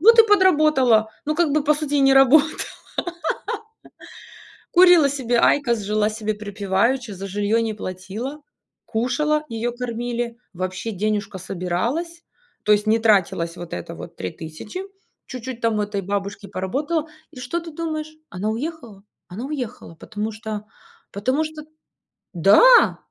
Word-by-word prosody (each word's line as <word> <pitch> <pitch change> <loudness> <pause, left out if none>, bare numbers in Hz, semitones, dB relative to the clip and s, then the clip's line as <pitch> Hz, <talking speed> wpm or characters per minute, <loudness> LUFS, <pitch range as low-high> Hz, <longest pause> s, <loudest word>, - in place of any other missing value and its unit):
вот 460 +6 +7
и 455 - +9
подработала". 305 - +4 0.2
Ну, 305 - 0
как 340 -1 +2
бы 300 -1 +1
по 300 +1 +4
сути 295 -1 -3
и 285 - +3
не 270 0 +5
работала, 275 +3 +6 2.2
курила 355 -4 +7
себе 255 -4 0
айкос, 235 -3 +3
жила 210 +1 0
себе 215 0 -3
припеваючи, 210 +4 -1
за 195 +1 -6
жильё 205 +3 +1
не 220 -1 -1
платила, 210 +10 -6 0.4
кушала, 300 +7 0
её 230 +1 -2
кормили, 240 -1 -3 0.2
вообще 185 +4 -4
денежка 205 -1 -2
собиралась. 230 - -3 0.4
То 210 - +4
есть 210 +1 +2
не 220 +1 +4
тратилась 185 -6 +2
вот 175 -1 -9
это 90 - -5
вот - - -10
3000, 160 - -7 0.4
чуть-чуть 255 -1 -7
там 225 -2 +1
у - - +1
этой 205 -1 -3
бабушки 200 +1 -4
поработала. 295 - -2 0.2
И 255 - -11
что 270 +8 -3
ты 330 - -9
думаешь? 310 -1 -4 0.2
Она 200 +3 -2
уехала 235 -5 -6 0.3
она 215 +8 -6
уехала, 250 - -6
потому 210 +6 -5
что 215 -1 -6 0.5
потому 255 +9 0
что 310 -1 -7 0.7
Да! 205 - +6
230 Hz, 140 wpm, -22 LUFS, 205-295 Hz, 2.2 s, и